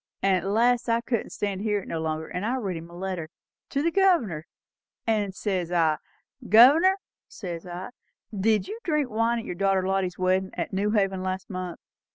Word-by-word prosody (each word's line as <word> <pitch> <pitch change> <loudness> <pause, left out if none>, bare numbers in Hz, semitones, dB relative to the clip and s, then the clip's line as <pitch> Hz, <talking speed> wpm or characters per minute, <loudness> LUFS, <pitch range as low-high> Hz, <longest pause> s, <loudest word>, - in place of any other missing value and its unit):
And 195 -1 +4
at 185 +1 -2
last 240 +2 +3
I 230 0 +2
couldn't 235 -2 -2
stand 200 -2 -3
it 210 -2 -1
no 165 - -3
longer; 160 0 -2
and 180 - -4
I 235 +4 0
writ 200 -8 -2
him 165 +1 -8
a 170 - -12
letter 180 -4 -4 0.4
to 280 +1 -1
the 335 - +2
Governor; 295 - +2 0.6
and 210 -4 0
says 185 -5 -2
I, 165 -3 +3 0.5
'Governor,' 290 - +7 0.3
says 175 -3 -7
I, 180 +4 -6 0.4
'did 210 +1 +2
you 430 +3 -6
drink 300 -7 0
wine 230 +2 +1
at 230 - -5
your - - -4
daughter 190 0 +1
Lottie's 190 -2 0
weddin' 185 +1 +1
at - - -3
New 200 +2 +1
Haven 195 -3 +1
last 185 +1 -4
month?' 185 -2 -5
195 Hz, 190 wpm, -26 LUFS, 180-230 Hz, 0.6 s, Governor